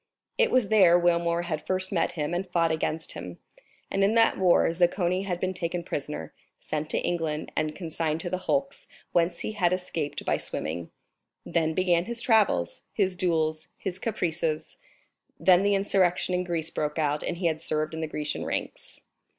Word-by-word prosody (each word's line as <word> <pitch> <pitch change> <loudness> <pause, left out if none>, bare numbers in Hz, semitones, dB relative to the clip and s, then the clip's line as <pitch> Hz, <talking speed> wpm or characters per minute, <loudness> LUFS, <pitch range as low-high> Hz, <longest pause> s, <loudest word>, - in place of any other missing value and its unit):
It 480 - +5
was 255 -5 +2
there 190 -5 +6
Wilmore 170 -1 +2
had 155 -3 -3
first 185 0 +1
met 180 - +1
him 150 0 -2
and 180 +1 -2
fought 170 -2 +2
against 160 0 -1
him; 85 +1 -8 0.5
and 195 - +2
in 205 +3 +3
that 230 0 +5
war 180 -2 +4
Zaccone 175 +2 +1
had 180 -3 -2
been 185 0 -1
taken 175 -1 -3
prisoner, 145 - -5 0.3
sent 155 0 -4
to - - +1
England, 160 -3 -2
and 155 0 -1
consigned 160 -3 -2
to 175 - -4
the 185 - -1
hulks, 275 +8 -2 0.2
whence 170 0 +1
he - - -3
had 185 -5 +1
escaped 170 -5 -3
by - - +2
swimming. 80 +2 -4 0.6
Then 160 -1 0
began 175 -2 +2
his 235 +1 -4
travels, 215 - +2
his 190 -3 0
duels, 160 -3 0
his 190 -2 -4
caprices; 165 -7 -2 0.6
then 180 +2 +6
the 200 0 +3
insurrection 190 -2 +2
in 180 0 0
Greece 165 -2 -2
broke 150 0 -2
out, 150 -1 +1
and 175 - -3
he 180 - -4
had 160 -2 +1
served 155 +1 -1
in 160 - -4
the 160 - -1
Grecian 150 -1 -3
ranks. - - -5
175 Hz, 180 wpm, -27 LUFS, 155-185 Hz, 0.6 s, there